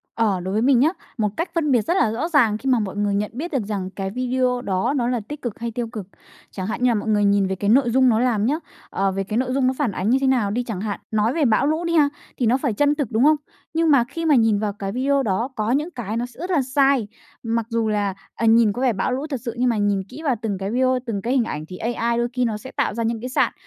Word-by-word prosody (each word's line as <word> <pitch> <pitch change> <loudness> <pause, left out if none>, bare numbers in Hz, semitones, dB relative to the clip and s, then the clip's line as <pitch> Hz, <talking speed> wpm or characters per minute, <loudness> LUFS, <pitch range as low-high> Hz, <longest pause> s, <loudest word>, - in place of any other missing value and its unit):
Ờ, 210 -5 +1
đối 185 +2 -4
với 215 - +1
mình 255 0 +4
nhớ, 290 +5 +5 0.3
một 215 -2 +1
cách 335 - -1
phân 310 -4 +1
biệt 245 -3 +4
rất 345 - 0
là 220 - +3
rõ 240 +9 -2
ràng 240 -10 +3
khi 265 +4 -3
mà 250 -2 +4
mọi 205 -3 -3
người 205 -1 0
nhận 205 +1 -1
biết 310 +9 -5
được 270 -7 0
rằng 200 -3 -3
cái 195 0 -4
video 250 +1 0
đó 200 +5 0
nó 240 -2 0
là 245 -1 0
tích 295 0 -7
cực 235 -5 -5
hay 235 0 -3
tiêu 235 +1 -3
cực, 215 -5 -7 0.4
chẳng 185 -1 -5
hạn 220 - -3
như 250 - +5
là - - +1
mọi 210 +1 -2
người 205 -1 +3
nhìn 200 -1 +3
về 190 - -2
cái 200 +2 -1
nội 245 +2 +4
dung 260 +2 +4
nó 225 -2 +3
làm 230 -4 +1
nhớ, 295 +6 +1 0.3
ờ, 195 0 0
về 195 +1 -2
cái 210 +3 -3
nội 255 0 0
dung 265 -1 +2
nó 260 - +2
phản 285 -7 0
ánh 190 +2 -2
như 255 - +4
thế 270 - +2
nào 240 -6 +2
đi 245 +4 -1
chẳng 220 -6 -5
hạn. 205 -1 -3
Nói 220 +2 +1
về 310 -2 +1
bão 230 +3 +3
lũ 315 +3 0
đi 335 - -1
ha, 295 -3 +5 0.3
thì 250 - 0
nó 235 +3 +3
phải 270 -4 -1
chân 290 +7 +2
thực, 285 -7 -3
đúng 220 +3 +2
không? 305 +2 +6 0.4
Nhưng 325 -1 +2
mà 275 -4 +5
khi 330 +7 -6
mà 305 -3 +5
nhìn 225 -4 +3
vào 210 -1 -2
cái 195 -1 -5
video 270 +4 +1
đó 225 +3 -1
có 215 +1 -1
những 295 +6 0
cái 230 - -4
nó 240 - -1
sẽ 245 +1 -15
rất 360 +3 -4
là 320 -6 +3
sai. 265 -3 +2 0.4
Mặc 230 -1 -1
dù 230 -2 0
là, 205 -2 0 0.2
ờ, 230 - -1
nhìn 225 -2 +5
có 245 - -5
vẻ 255 -3 +3
bão 195 - -1
lũ 270 +4 -2
thật 275 -5 -3
sự 235 - -3
nhưng 250 +1 +2
mà 230 - 0
nhìn 205 -2 +1
kỹ 275 +5 -9
vào 270 -4 +2
từng 210 -4 -2
cái 195 +1 -4
video, 255 +1 +2
từng 215 -5 -3
cái 240 +5 -1
hình 260 -3 +3
ảnh 155 -8 -5
thì 180 - -8
AI 235 +1 -1
đôi 240 0 +1
khi 250 0 +1
nó 220 -2 -1
sẽ 260 +5 -10
tạo - - -1
ra 230 +2 -2
những 225 0 -1
cái 250 - -5
sạn. 255 - +1
235 Hz, 310 wpm, -22 LUFS, 210-260 Hz, 0.4 s, không